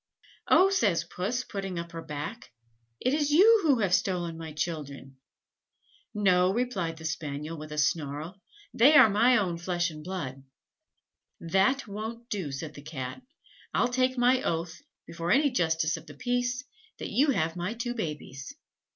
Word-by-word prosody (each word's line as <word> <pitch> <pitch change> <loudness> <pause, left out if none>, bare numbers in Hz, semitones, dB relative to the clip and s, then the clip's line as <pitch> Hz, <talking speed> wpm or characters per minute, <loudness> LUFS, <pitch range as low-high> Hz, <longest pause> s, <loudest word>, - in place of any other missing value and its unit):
"Oh!" 380 +2 +5
says 200 - +2
Puss, 205 +9 -3
putting 195 -5 -5
up 170 0 -5
her 165 - -6
back, 155 +8 -7 0.5
"it 255 - +1
is 295 -1 +1
you 415 +9 +7
who 280 - +3
have 190 -3 +1
stolen 175 -3 0
my 160 -1 -7
children." 145 -4 -5 0.9
"No!" 185 -3 +3
replied 195 -8 -2
the 160 - -10
Spaniel, 150 0 -4
with 155 -1 -9
a 150 - -6
snarl; 150 +4 -1 0.3
"they 275 +7 +6
are 255 -8 +8
my 240 +5 +5
own 180 -5 -1
flesh 175 -1 -1
and 155 -1 -10
blood." 145 -7 -5 1.0
"That 195 +11 +1
won't 220 +4 -6
do," 185 -9 -3
said 150 +3 -6
the 145 - -11
Cat; 140 - -6 0.5
"I'll 250 - +3
take 255 +1 +1
my 250 +1 +4
oath, 165 0 -3 0.2
before 170 0 -5
any 285 +1 +4
Justice 160 -7 +1
of 160 +1 -13
the - - -11
Peace, 245 +1 -1 0.3
that - - -6
you 285 +4 +3
have 165 -10 0
my 180 +6 -3
two 240 +1 -3
babies." 150 - -6
180 Hz, 160 wpm, -28 LUFS, 160-245 Hz, 1.0 s, are